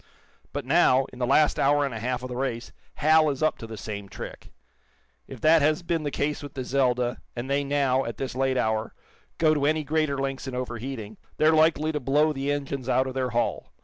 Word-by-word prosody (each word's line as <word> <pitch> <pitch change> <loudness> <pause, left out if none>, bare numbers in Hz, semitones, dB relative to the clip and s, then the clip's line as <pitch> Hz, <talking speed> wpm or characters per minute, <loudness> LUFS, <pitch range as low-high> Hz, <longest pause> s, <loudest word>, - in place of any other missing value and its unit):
But - - -4
now, 130 +1 +4
in 125 - -11
the 125 - 0
last 150 +3 +3
hour 145 +1 +3
and 135 - -4
a 115 - -5
half 125 +2 -2
of - - -3
the 125 - -5
race, 125 -2 -3 0.2
Hal 155 +1 +4
is 140 +1 -3
up 155 - +1
to 115 - -7
the 110 -1 -8
same 100 -2 -6
trick. - - -9 0.8
If - - -9
that 160 +1 +5
has 155 +3 +2
been 170 -1 -1
the 150 - -2
case 145 +1 -2
with 145 -1 -9
the 130 - -3
'Zelda,' 125 -2 0 0.2
and 120 +1 -4
they 140 +1 +1
now, 140 -2 +1
at 115 -2 -5
this 135 - -4
late 130 0 0
hour, 110 -1 -1 0.4
go 155 -1 +4
to 145 -2 +1
any 155 0 +1
greater 155 -1 0
lengths 135 0 -3
in 130 - -4
overheating, 120 -3 -5 0.2
they're 155 +1 +4
likely 155 0 +3
to 150 - -2
blow 145 +4 +2
the 140 0 -2
engines 140 -2 -3
out 130 +1 +3
of 130 - -4
their 130 -1 -1
hull. 120 0 -2
135 Hz, 225 wpm, -26 LUFS, 125-150 Hz, 0.8 s, that